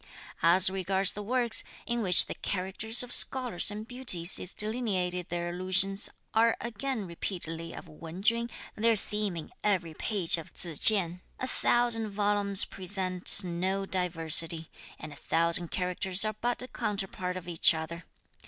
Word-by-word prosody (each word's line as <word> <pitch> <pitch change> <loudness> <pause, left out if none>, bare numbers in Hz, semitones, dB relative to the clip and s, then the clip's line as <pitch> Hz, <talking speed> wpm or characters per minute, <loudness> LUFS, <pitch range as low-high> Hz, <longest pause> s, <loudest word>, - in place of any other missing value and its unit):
"As 175 +4 +5
regards 190 0 0
the 210 - -7
works, 240 +2 -1 0.2
in 235 0 -2
which 180 -4 +5
the - - -6
characters 200 +5 -2
of 245 - -9
scholars 250 -10 +2
and 210 +2 -7
beauties 215 -9 +1
is 180 - -3
delineated 195 -6 -2
their 175 0 -3
allusions 190 +3 +1 0.2
are 225 +1 +2
again 235 0 -4
repeatedly 165 -2 -6
of - - -10
Wen 165 +4 -10
Chün, 235 +1 +1 0.3
their 225 +1 +2
theme 210 -3 -2
in 160 - -8
every 180 -6 -1
page 175 -1 -1
of 160 - -12
Tzu 170 -2 -6
Chien; 180 -3 +5 0.2
a - - -3
thousand 240 -3 +1
volumes 205 -1 +1
present 185 0 +5
no 185 +3 -2
diversity; 165 -3 0 0.3
and 155 -1 -10
a - - -14
thousand 170 +2 +1
characters 180 +2 -1
are 215 - -2
but 240 +3 -3
a - - -8
counterpart 195 -5 -4
of 180 -1 -10
each 170 -1 +3
other. 160 +1 -7
190 Hz, 155 wpm, -28 LUFS, 175-215 Hz, 0.3 s, As